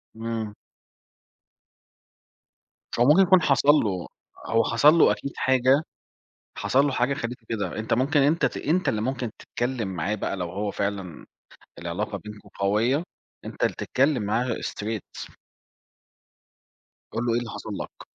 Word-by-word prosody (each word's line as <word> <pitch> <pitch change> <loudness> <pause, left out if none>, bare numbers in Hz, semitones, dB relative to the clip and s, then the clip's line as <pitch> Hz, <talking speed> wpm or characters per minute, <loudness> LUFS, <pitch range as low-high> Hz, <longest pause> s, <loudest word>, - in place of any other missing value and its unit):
إمم. 115 -2 -4 2.5
هو 120 - +5
ممكن 155 +7 +6
يكون 185 -1 +6
حصل 140 -2 +2
له 105 - +3 0.4
هو 115 0 +2
حصل 130 +7 +5
له 165 - +5
أكيد 140 - -3
حاجة، 130 +2 +3 0.8
حصل 135 +2 +2
له 145 - +1
حاجة 130 +1 +1
خلّيته 120 -3 -5
كده، 110 -1 -3
أنت 110 - -1
ممكن 135 +6 +2
أنت 150 +5 +3
ت - - -2
أنت 175 +5 +1
اللي 110 - -1
ممكن 125 -1 -2
تتكلم 120 -3 -3
معاه 95 +2 -2
بقى، 100 - -3
لو 90 -2 -3
هو 100 +2 -2
فعلًا 100 -5 -4 0.5
العلاقة 100 +5 -3
بينكم 105 0 -11
قوية، 110 +10 +2 0.4
أنت - - -5
اللي - - +1
تتكلم 135 -3 +1
معاه 115 +4 0
straight 110 0 -6 1.7
قُل 120 - -2
له 120 - +1
إيه 120 - +2
اللي 120 -1 -6
حصل - - -7
لك؟ - - -10
115 Hz, 140 wpm, -25 LUFS, 105-135 Hz, 2.5 s, ممكن